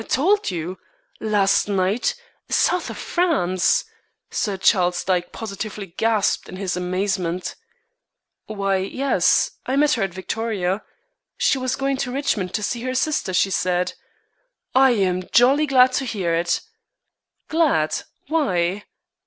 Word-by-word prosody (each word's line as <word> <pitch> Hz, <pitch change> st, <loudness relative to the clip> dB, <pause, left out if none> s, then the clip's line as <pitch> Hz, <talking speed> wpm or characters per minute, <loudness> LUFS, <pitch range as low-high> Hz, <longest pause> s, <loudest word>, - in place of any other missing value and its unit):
"Told 395 Hz, +10 st, +2 dB
you 180 Hz, 0 st, -4 dB, 0.4 s
last 205 Hz, -3 st, +2 dB
night 205 Hz, -, 0 dB, 0.3 s
South 360 Hz, 0 st, +1 dB
of -, -, -7 dB
France!" 275 Hz, -, +1 dB, 0.5 s
Sir 205 Hz, -3 st, -1 dB
Charles 180 Hz, -2 st, +2 dB
Dyke 180 Hz, -2 st, 0 dB
positively 200 Hz, -3 st, -6 dB
gasped 225 Hz, -1 st, +1 dB
in -, -, -8 dB
his 185 Hz, -2 st, -2 dB
amazement. 180 Hz, -1 st, -2 dB, 0.9 s
"Why, 195 Hz, -2 st, 0 dB
yes. 260 Hz, +9 st, +2 dB, 0.2 s
I 260 Hz, -, 0 dB
met 295 Hz, +1 st, +4 dB
her 230 Hz, -, -1 dB
at 195 Hz, -2 st, 0 dB
Victoria. 195 Hz, -1 st, -2 dB, 0.6 s
She 270 Hz, -, +2 dB
was 255 Hz, 0 st, -1 dB
going 275 Hz, 0 st, -1 dB
to 255 Hz, -2 st, -3 dB
Richmond 230 Hz, -9 st, -1 dB
to 215 Hz, -, -2 dB
see 235 Hz, +3 st, -2 dB
her 255 Hz, +1 st, -3 dB
sister, 295 Hz, -7 st, 0 dB
she 195 Hz, +2 st, +2 dB
said." 180 Hz, -1 st, 0 dB, 0.8 s
"I 265 Hz, -1 st, +5 dB
am 185 Hz, -3 st, +1 dB
jolly 275 Hz, +6 st, +5 dB
glad 255 Hz, -1 st, +5 dB
to 270 Hz, -, 0 dB
hear 190 Hz, -8 st, -1 dB
it." 170 Hz, +1 st, +1 dB, 0.9 s
"Glad! 285 Hz, -, +2 dB, 0.3 s
Why?" 200 Hz, -, 0 dB
205 Hz, 130 wpm, -22 LUFS, 185-260 Hz, 0.9 s, I